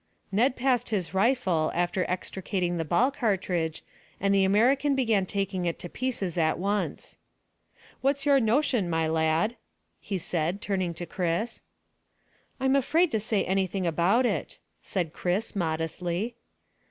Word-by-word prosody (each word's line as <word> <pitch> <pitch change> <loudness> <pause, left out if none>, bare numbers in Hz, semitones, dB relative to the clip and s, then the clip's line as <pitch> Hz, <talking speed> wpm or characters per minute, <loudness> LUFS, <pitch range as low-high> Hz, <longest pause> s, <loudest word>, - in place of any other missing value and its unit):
Ned 245 +6 +2
passed 255 -2 +1
his 195 -5 -2
rifle, 190 -7 +2
after 175 +1 0
extracting 180 -1 -2
the 165 - 0
ball 200 - +2
cartridge, 185 - -1 0.4
and 200 +1 +2
the 195 -1 +4
American 255 +9 +3
began 225 -8 +2
taking 195 -2 -1
it 170 - -1
to 175 - -6
pieces 200 -9 -2
at 160 -1 +2
once. 200 +4 -2 0.8
"What's 275 +1 +1
your 280 -1 +5
notion, 240 -4 +2
my 165 -1 +1
lad?" 160 +8 +1 0.4
he 200 - -3
said, 170 +2 -1
turning 185 -5 -2
to 175 - -5
Chris. 175 +6 -2 1.0
"I'm 265 +1 +2
afraid 315 +6 +3
to 220 - +1
say 210 -1 0
anything 190 0 0
about 175 +9 +3
it," - - -2 0.2
said 175 -5 -2
Chris 190 +6 -2
modestly. 175 +5 -2
195 Hz, 140 wpm, -27 LUFS, 175-235 Hz, 1.0 s, your